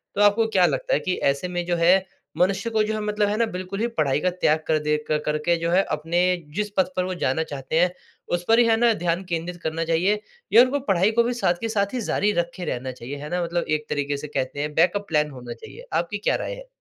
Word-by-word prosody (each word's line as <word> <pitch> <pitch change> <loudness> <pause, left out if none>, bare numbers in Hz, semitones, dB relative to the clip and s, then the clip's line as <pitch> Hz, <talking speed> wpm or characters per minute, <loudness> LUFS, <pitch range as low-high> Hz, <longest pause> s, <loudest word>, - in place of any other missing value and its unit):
तो 200 - +1
आपको 205 +2 +4
क्या 190 -5 +4
लगता - - 0
है - - +3
कि 185 - -1 0.2
ऐसे 140 +6 -4
में 175 -1 -3
जो 175 0 0
है 180 +3 +4 0.3
मनुष्य 195 +6 +1
को 220 -1 +1
जो 215 +1 -2
है 215 - -2
मतलब 210 0 0
है 210 - 0
ना 230 - +3
बिल्कुल 185 +2 -5
ही 230 - +1
पढाई 140 -2 +2
का 185 - +2
त्याग 160 -3 +2
कर 155 - +2
दे 150 0 +1
क 150 0 +1
करके 150 +3 +1
जो 170 0 -1
है 185 +2 +5
अपने 165 +3 -1 0.4
जिस 210 +1 -1
पथ 190 - +5
पर 185 - +2
वो 185 - -3
जाना 135 +5 +1
चाहते 145 +1 -2
हैं, 180 +1 +3 0.4
उस 175 0 -1
पर 225 +1 +5
ही 240 - +6
है 225 -1 +4
ना 235 0 +4
ध्यान 175 -1 -1
केंद्रित 170 +1 -3
करना 160 +1 -2
चाहिए 180 +6 +1 0.3
या 235 - +9
उनको 265 +3 0
पढ़ाई 190 +3 +3
को 235 +1 +3
भी 240 +1 -1
साथ 235 -7 +1
के 225 - -2
साथ 200 -1 0
ही 250 - -2
जारी 205 -1 +1
रखे 175 +1 -7
रहना 130 -3 -3
चाहिए, 130 +3 -8
है 150 +1 -7
ना 180 0 -1
मतलब 170 0 -1
एक 155 0 0
तरीक़े 145 0 -1
से 150 - -7
कहते 145 0 -3
है 150 - -1
बैकअप 185 +6 +2
प्लान 150 -2 +1
होना 125 -3 -8
चाहिए? 475 - -12
आपकी 175 +5 -1
क्या 210 - +1
राय - - -3
है? - - -12
175 Hz, 265 wpm, -24 LUFS, 155-210 Hz, 0.4 s, या